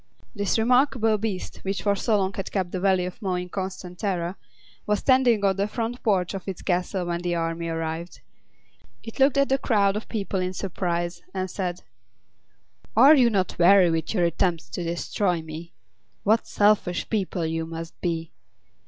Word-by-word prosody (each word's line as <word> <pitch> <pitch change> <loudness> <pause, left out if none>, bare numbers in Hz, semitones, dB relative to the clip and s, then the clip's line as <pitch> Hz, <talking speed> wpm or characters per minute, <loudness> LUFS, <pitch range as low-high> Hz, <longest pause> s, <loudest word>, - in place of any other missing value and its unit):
This 205 +1 0
remarkable 230 -2 +3
beast, 200 -4 -4
which 195 +1 -4
for 200 -1 +2
so 215 +2 +1
long 195 -1 0
had 195 - -5
kept 185 -3 -1
the 185 - -3
Valley 190 -1 +2
of 180 +4 -7
Mo 190 -3 -1
in 180 0 -4
constant 185 -1 -5
terror, 180 -3 -2 0.5
was 210 0 +2
standing 245 -4 +3
on 195 -1 +3
the 200 +1 +1
front 235 +2 -4
porch 190 -5 +1
of 195 -1 -6
its 190 -3 -5
castle 180 0 -1
when 170 0 -2
the 175 -1 -1
army 165 0 -2
arrived. 165 +1 -4 0.8
It 225 - -9
looked 270 +1 +4
at 275 0 +3
the 270 0 +2
crowd 200 -6 +2
of 210 - -5
people 200 -3 -2
in 185 0 -2
surprise, 175 -2 -3
and 185 -1 -2
said: 180 -2 -3 1.1
"Are 270 +6 +9
you 250 -4 +5
not 190 -6 -1
weary 180 0 +6
with 160 -1 -1
your 180 - +2
attempts 170 -4 0
to 175 +8 -4
destroy 170 +1 -1
me? 160 +2 -8 0.5
What 220 +3 +2
selfish 205 -4 +2
people 190 -5 -1
you 160 0 -2
must 165 0 -8
be! 165 -2 -2
190 Hz, 180 wpm, -25 LUFS, 175-210 Hz, 1.1 s, Are